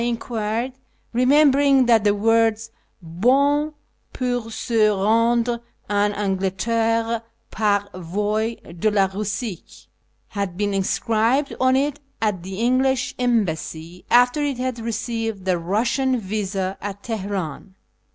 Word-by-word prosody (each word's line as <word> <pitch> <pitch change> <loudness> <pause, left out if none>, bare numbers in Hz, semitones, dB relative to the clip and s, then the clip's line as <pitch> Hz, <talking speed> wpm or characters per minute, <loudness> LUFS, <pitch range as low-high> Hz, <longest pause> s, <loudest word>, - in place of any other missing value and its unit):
I - - 0
en 240 -1 0
quired, 230 +2 -3 0.4
remembering 275 +1 +4
that 230 -3 +4
the 205 -1 +3
words 225 +1 +2 0.3
''hon 280 - +2 0.4
poiir 245 -3 -2
se 225 -1 +2
rendre 230 +4 +2 0.3
en 205 0 +2
Anglderre 225 +4 0 0.3
'par 205 -2 +1
voie 210 +6 -2 0.2
de 215 - +3
la 200 -2 +3
Bussie" 205 0 -5 0.4
had 200 -4 -4
been 205 0 0
inscribed 225 +7 +1
on 260 0 +3
it 285 +2 0 0.2
at 210 -5 0
the 190 +2 -7
English 255 +1 +1
Embassy 180 -7 -1
after 245 +4 +4
it 285 -3 -1
had 255 -1 -3
received 225 -3 -3
the 190 - +2
Eussian 230 +9 0
visa 195 -2 -3
at 200 0 -6
Teheran. 195 -5 -4
225 Hz, 120 wpm, -22 LUFS, 200-245 Hz, 0.4 s, remembering